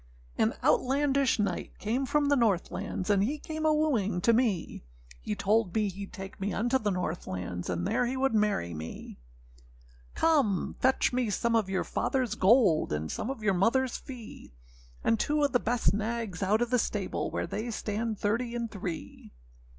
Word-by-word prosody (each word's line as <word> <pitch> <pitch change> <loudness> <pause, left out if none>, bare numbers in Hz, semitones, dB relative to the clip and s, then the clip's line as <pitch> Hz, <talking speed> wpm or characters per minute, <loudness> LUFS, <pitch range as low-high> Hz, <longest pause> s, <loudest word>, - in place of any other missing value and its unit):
] - - -27
AN - - +2
Outlandish 275 0 +2
knight 200 -5 -2
came 245 +5 -1
from 295 +3 +2
the 285 - +4
North 215 -9 +1
lands, 185 +2 -3
And 200 -1 +3
he 280 +8 -1
came 315 +1 -3
a - - +5
wooing 255 - +1
to 230 - +4
me; 220 - 0 0.4
He 210 - -3
told 205 -1 +1
me 210 -2 +1
heâd 195 +2 -8
take 195 0 -9
me 200 +1 -1
unto 245 +5 +1
the 210 - 0
North 180 -3 -3
lands, 90 -1 -4
And 85 -1 -1
there 245 - +1
he 260 +2 -2
would 270 -2 +1
marry 210 - +1
me. 80 -4 -8 1.0
âCome, 275 - +2
fetch 260 0 +2
me 245 -3 +1
some 230 +3 +1
of 215 -4 +1
your 190 -1 0
fatherâs 250 -5 -1
gold, 200 -4 +4
And 75 +1 -2
some 230 - -3
of 265 -5 -5
your 200 -2 +3
motherâs 235 +7 +1
fee; 230 - -10 0.5
And 225 -1 +2
two 295 0 +1
of 285 - +2
the 245 - +3
best 240 -2 +1
nags 215 -2 -3
out 210 +4 +2
of 240 - -5
the 250 - +3
stable, 205 -3 -2
Where - - -2
they 215 +7 -4
stand 220 0 -3
thirty 235 +4 -1
and 235 -1 -3
three. 180 -5 -6
220 Hz, 190 wpm, -29 LUFS, 195-250 Hz, 1.0 s, a